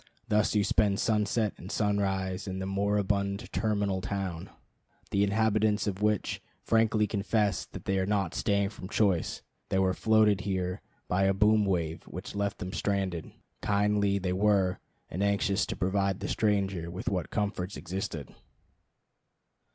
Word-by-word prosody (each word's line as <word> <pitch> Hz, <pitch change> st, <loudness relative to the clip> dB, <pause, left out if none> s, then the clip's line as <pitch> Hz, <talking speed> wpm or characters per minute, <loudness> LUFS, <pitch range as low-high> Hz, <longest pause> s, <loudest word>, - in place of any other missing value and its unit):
Thus 105 Hz, +1 st, +2 dB
you 105 Hz, -, +4 dB
spend 100 Hz, -1 st, +2 dB
sunset 105 Hz, 0 st, +1 dB
and 95 Hz, -, -9 dB
sunrise 95 Hz, -2 st, 0 dB
in 95 Hz, 0 st, -3 dB
the 95 Hz, -, -3 dB
moribund 100 Hz, +1 st, 0 dB
terminal 100 Hz, -3 st, 0 dB
town, 95 Hz, -3 st, -4 dB, 0.6 s
the 100 Hz, -, +3 dB
inhabitants 110 Hz, 0 st, +2 dB
of 100 Hz, -1 st, -3 dB
which 105 Hz, -2 st, 0 dB, 0.2 s
frankly 110 Hz, -1 st, +3 dB
confess 105 Hz, 0 st, 0 dB
that -, -, -10 dB
they 95 Hz, 0 st, +1 dB
are 95 Hz, -, 0 dB
not 100 Hz, -4 st, 0 dB
staying 100 Hz, -1 st, +1 dB
from 95 Hz, -3 st, -9 dB
choice. 100 Hz, -6 st, +1 dB, 0.3 s
They -, -, +1 dB
were 95 Hz, -1 st, +3 dB
floated 110 Hz, -1 st, +3 dB
here 95 Hz, -1 st, -2 dB, 0.3 s
by 95 Hz, +2 st, +2 dB
a 95 Hz, 0 st, +3 dB
boom 105 Hz, +1 st, +4 dB
wave, 85 Hz, -4 st, -1 dB
which -, -, -7 dB
left 100 Hz, -1 st, -1 dB
them 90 Hz, +1 st, -6 dB
stranded. 95 Hz, -5 st, -1 dB, 0.3 s
Kindly 100 Hz, 0 st, +2 dB
they 90 Hz, -2 st, -1 dB
were, 95 Hz, -1 st, +2 dB, 0.3 s
and 90 Hz, -, -4 dB
anxious 100 Hz, -1 st, +1 dB
to -, -, -3 dB
provide 95 Hz, 0 st, 0 dB
the -, -, -3 dB
stranger 100 Hz, -5 st, 0 dB
with 90 Hz, +2 st, -7 dB
what 90 Hz, -5 st, -1 dB
comforts 100 Hz, -2 st, -2 dB
existed. 90 Hz, -, -5 dB
100 Hz, 150 wpm, -29 LUFS, 95-105 Hz, 0.6 s, you